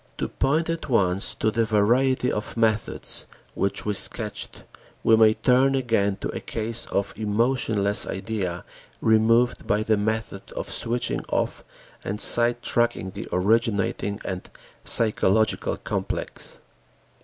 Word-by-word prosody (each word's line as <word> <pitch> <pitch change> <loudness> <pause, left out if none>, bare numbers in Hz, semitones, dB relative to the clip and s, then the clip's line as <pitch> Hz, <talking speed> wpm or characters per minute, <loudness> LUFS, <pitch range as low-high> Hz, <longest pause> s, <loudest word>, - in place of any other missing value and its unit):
To - - -2
point 150 +5 0
at 165 -2 -4
once 95 -5 +1
to 110 - 0
the 115 +1 +1
variety 120 +5 +2
of 105 - -5
methods 110 -1 +2 0.3
which 100 - -2
we 105 - 0
sketched, - - -2 0.4
we 115 - +5
may 110 -1 +5
turn 130 +2 +3
again 115 -6 +1
to - - -2
a - - -4
case 115 +1 -3
of 100 - -2
emotionless 110 -1 0
idea 95 -4 -4 0.3
removed 115 +2 +2
by 105 +1 +1
the 110 -1 +1
method 110 -1 -3
of - - -6
switching 120 +1 -1
off - - -2 0.4
and 105 +2 -4
side 120 +2 +3
tracking 120 -5 0
the - - -7
originating 100 0 0
and 95 -1 -5 0.3
physiological 110 -1 +3
"complex." - - -4
110 Hz, 130 wpm, -24 LUFS, 100-120 Hz, 0.4 s, we